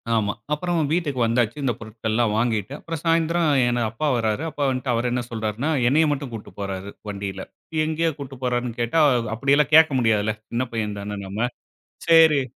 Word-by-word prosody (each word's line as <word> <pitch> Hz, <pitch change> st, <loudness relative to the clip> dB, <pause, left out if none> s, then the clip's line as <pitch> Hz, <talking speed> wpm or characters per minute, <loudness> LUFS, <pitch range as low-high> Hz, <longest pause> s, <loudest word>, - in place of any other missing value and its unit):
ஆமா. 105 Hz, -2 st, +1 dB, 0.2 s
அப்புறம் 175 Hz, +3 st, -1 dB
வீட்டுக்கு 155 Hz, -6 st, 0 dB
வந்தாச்சு 115 Hz, +2 st, +1 dB
இந்த 125 Hz, -3 st, +1 dB
பொருட்கள்லாம் 110 Hz, 0 st, -1 dB
வாங்கிட்டு. 115 Hz, 0 st, 0 dB
அப்புறம் 165 Hz, -2 st, -6 dB
சாயந்திரம் 165 Hz, 0 st, +2 dB, 0.2 s
என் 120 Hz, 0 st, +1 dB
அப்பா 120 Hz, +7 st, -2 dB
வராரு. 110 Hz, +5 st, -1 dB
அப்பா 145 Hz, -, -3 dB
வந்துட்டு 130 Hz, -1 st, -1 dB
அவரு 120 Hz, +2 st, 0 dB
என்ன 125 Hz, -, 0 dB
சொல்றாருன்னா, 110 Hz, +5 st, -2 dB, 0.2 s
என்னைய 155 Hz, +5 st, +4 dB
மட்டும் 140 Hz, -3 st, -3 dB
கூட்டு 110 Hz, -2 st, -8 dB
போறாரு 100 Hz, 0 st, -4 dB, 0.2 s
வண்டில. 100 Hz, -1 st, -5 dB, 0.4 s
எங்கேயோ 160 Hz, +1 st, 0 dB
கூட்டு 135 Hz, -1 st, -7 dB
போறாருன்னு 120 Hz, -1 st, -1 dB
கேட்டா 120 Hz, +8 st, +1 dB, 0.3 s
அப்டியெல்லாம் 140 Hz, +5 st, +2 dB
கேக்க 160 Hz, -2 st, +7 dB
முடியாதுல, 110 Hz, -2 st, +2 dB, 0.2 s
சின்ன 120 Hz, +2 st, 0 dB
பையன் 105 Hz, -3 st, -3 dB
தான 105 Hz, 0 st, -5 dB
நம்ம. 105 Hz, +6 st, -1 dB, 0.6 s
சேரி, 160 Hz, -4 st, +6 dB
120 Hz, 160 wpm, -23 LUFS, 110-150 Hz, 0.6 s, கேக்க